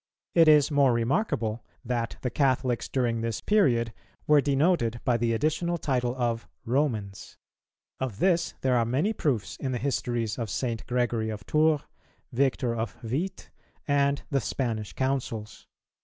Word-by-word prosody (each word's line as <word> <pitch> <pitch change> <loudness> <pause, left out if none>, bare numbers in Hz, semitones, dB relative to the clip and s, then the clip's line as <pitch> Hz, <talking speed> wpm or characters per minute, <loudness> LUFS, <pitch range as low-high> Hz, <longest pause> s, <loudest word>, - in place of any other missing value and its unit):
It 165 -2 +6
is 150 -1 +6
more 140 -3 +4
remarkable 115 - 0 0.2
that 120 -1 -2
the 125 - -2
Catholics 130 -3 +1
during 120 -3 0
this 115 -2 -2
period 120 - +2 0.3
were 150 -1 +5
denoted 140 -4 +1
by 125 - +3
the 115 0 +1
additional 155 +8 0
title 125 -5 -1
of 115 -5 -1 0.2
"Romans." 115 -7 -2 0.6
Of 130 -7 -3
this 175 - +1
there 130 -1 +2
are 120 - +3
many 140 - 0
proofs 130 - -1
in 130 -2 -3
the - - 0
histories 120 -3 -2
of 115 -2 -3
St. 115 +1 -3
Gregory 120 -3 0
of 105 -3 -6
Tours, 155 +2 +3 0.5
Victor 125 -2 +1
of 110 -3 -3
Vite, 155 +12 -3 0.4
and 140 -1 +2
the 135 -2 +2
Spanish 110 -6 -3
Councils. 130 -5 -3
125 Hz, 145 wpm, -27 LUFS, 115-145 Hz, 0.6 s, It